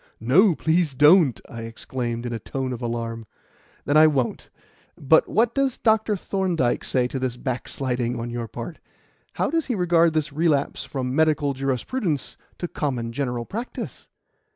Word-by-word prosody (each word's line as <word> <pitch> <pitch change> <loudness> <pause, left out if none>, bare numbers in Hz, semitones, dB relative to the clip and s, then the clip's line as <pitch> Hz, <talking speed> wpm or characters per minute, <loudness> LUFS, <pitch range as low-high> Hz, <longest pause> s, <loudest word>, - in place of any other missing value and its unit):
"No, 165 - +4
please 160 -3 +1
don't!" 150 -1 +5
I 115 - -8
exclaimed 120 +1 -4
in 120 - -3
a 115 - -3
tone 130 +3 -4
of 120 - -7
alarm. 115 -1 -4 0.6
"Then 145 - +3
I 155 0 +8
won't. 135 -6 -1 0.5
But 160 +3 +4
what 230 +2 +2
does 275 -2 +1
Dr. 220 -2 +2
Thorndyke 180 -10 0
say 125 -2 +2
to 130 - -4
this 125 -2 -2
backsliding 125 -1 -2
on 120 +1 -4
your 120 -1 -4
part? 120 +9 -7 0.5
How - - -1
does 325 -1 0
he 250 - 0
regard 170 -3 +3
this 150 -3 -1
relapse 150 -2 +1
from 130 -2 -3
medical 150 -2 +2
jurisprudence 135 - -2 0.2
to 175 - -3
common 125 -8 -3
general 125 -2 -3
practice?" 230 - -6
140 Hz, 155 wpm, -24 LUFS, 120-170 Hz, 0.6 s, I